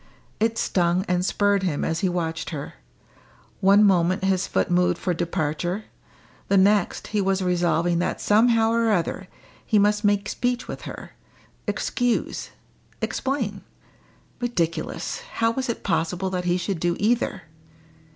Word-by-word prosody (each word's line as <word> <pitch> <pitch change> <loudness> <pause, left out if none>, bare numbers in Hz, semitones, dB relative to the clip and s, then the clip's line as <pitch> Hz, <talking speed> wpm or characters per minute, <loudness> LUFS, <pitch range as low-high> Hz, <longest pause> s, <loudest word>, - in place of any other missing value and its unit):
It 225 +1 +1
stung 180 -1 +1
and 180 0 +1
spurred 200 +1 +2
him 175 -6 -1
as 165 0 -1
he 190 - +1
watched 165 -2 -2
her; 145 -3 -6 0.9
one 200 +2 +5
moment 185 -2 +3
his 190 -1 +1
foot - - 0
moved 175 0 +3
for 180 - -1
departure, 175 +3 -2 0.6
the 200 - +3
next 200 0 +2
he 210 - +2
was 195 0 +1
resolving 175 -1 +1
that 175 - -1
somehow 225 +1 +4
or 230 0 +2
other 185 0 -1 0.4
he 220 - +2
must 210 +1 +3
make 205 0 +2
speech 245 +2 -1
with - - -7
her - - -9 0.6
excuse 245 -2 -1 0.5
explain. 235 -8 -2 0.8
Ridiculous! 180 - -2
How 230 0 +2
was 260 +2 -3
it 235 - -3
possible 180 +1 -1
that 180 -1 -2
he 175 0 +2
should 185 0 -3
do 175 +1 +1
either! 230 +4 0
190 Hz, 140 wpm, -24 LUFS, 175-210 Hz, 0.9 s, one